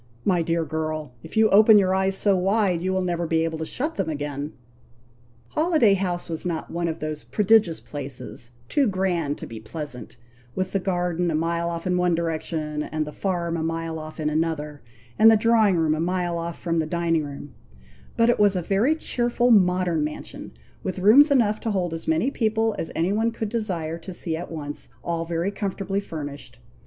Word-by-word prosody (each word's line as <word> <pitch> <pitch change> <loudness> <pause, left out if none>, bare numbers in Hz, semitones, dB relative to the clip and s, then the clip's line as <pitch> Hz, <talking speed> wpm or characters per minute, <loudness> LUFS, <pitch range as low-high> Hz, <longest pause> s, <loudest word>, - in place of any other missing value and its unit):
My 180 -3 +3
dear 165 0 0
girl, 155 -2 -3
if - - -9
you 220 0 +6
open 215 +2 +7
your 190 -2 +3
eyes 190 0 +1
so 200 -1 +3
wide, 190 -1 +1
you 185 +1 -1
will 190 0 0
never 175 -1 -1
be 160 0 +2
able 160 -1 -2
to 160 - -3
shut 310 +5 -3
them - - -1
again!" 145 0 -4 1.0
Holiday 310 - +3
House 180 -2 -1
was 160 -2 -4
not 170 -3 -3
one 170 0 -1
of 160 - -3
those 155 -1 -5
prodigious 210 -5 +3
places, 135 -4 -7 0.2
too 280 - +2
grand 180 -7 0
to - - -7
be 115 -1 -8
pleasant, 125 -1 -7 0.4
with 185 0 -2
the 195 - +1
garden 180 -2 -1
a 160 - 0
mile 170 +1 0
off 170 -1 -5
in 180 -1 +1
one 180 -1 +2
direction, 160 -2 -2
and 155 0 -2
the 150 - -8
farm 175 -3 -2
a 165 - -2
mile 165 0 -3
off 155 0 -9
in 155 - -1
another, 150 -1 -2 0.4
and 225 - +9
the 220 - +6
drawing 220 -3 +4
room 160 -2 +2
a 155 - -2
mile 175 0 -1
off 170 0 -5
from 165 -1 -1
the 155 - -1
dining 165 -1 0
room; 145 -1 -8 0.6
but 230 - +4
it 240 - +3
was 205 -2 +4
a 180 - 0
very 210 - +2
cheerful 245 -4 +1
modern 180 -5 +3
mansion, 150 0 -6 0.3
with 185 - -4
rooms 225 +11 +7
enough 225 -6 +3
to 225 - -3
hold 180 -5 -1
as 165 - -6
many 160 - +2
people 225 -2 +1
as 160 - -3
any 175 +4 +1
one 225 +2 +2
could 225 -2 -4
desire 175 -8 -2
to 185 +3 -8
see 165 -2 -3
at 170 +2 -6
once, 145 -3 -5
all 165 -1 -2
very 170 +3 -1
comfortably 200 -1 -2
furnished. 145 -8 -7
170 Hz, 200 wpm, -24 LUFS, 160-200 Hz, 1.0 s, and